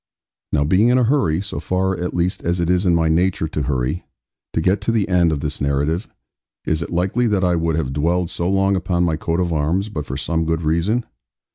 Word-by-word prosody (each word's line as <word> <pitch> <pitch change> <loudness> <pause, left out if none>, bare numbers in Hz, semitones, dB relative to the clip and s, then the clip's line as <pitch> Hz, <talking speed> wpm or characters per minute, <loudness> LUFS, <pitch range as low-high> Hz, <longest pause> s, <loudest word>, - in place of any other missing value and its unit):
Now 75 -1 +2
being 95 +9 +3
in 125 +1 +4
a 125 - +3
hurry 115 - +2
so 100 - -5
far 95 +1 0
at 90 0 -4
least 90 +2 -1
as 85 +1 0
it 85 0 +1
is 90 +1 +1
in 85 - +4
my 80 -1 +2
nature 85 +1 +1
to 75 - -3
hurry 65 +3 -1 0.5
to - - -1
get 95 +5 +1
to 105 - 0
the 110 -4 +1
end 90 -3 +3
of 75 -3 -2
this 75 0 -4
narrative, 70 +6 0 0.6
is 80 +1 0
it - - -4
likely 95 +8 +1
that 100 -3 +1
I 90 -1 +2
would 80 -1 0
have 70 -5 -2
dwelled 85 +4 0
so 85 +1 -1
long 95 0 +2
upon 90 -1 0
my 85 -2 +1
coat 80 +2 -2
of 85 -2 0
arms, 85 +7 0
but 75 -8 -5
for - - -4
some 80 -1 -1
good 80 0 -1
reason? 85 +10 +1
85 Hz, 235 wpm, -20 LUFS, 80-95 Hz, 0.6 s, in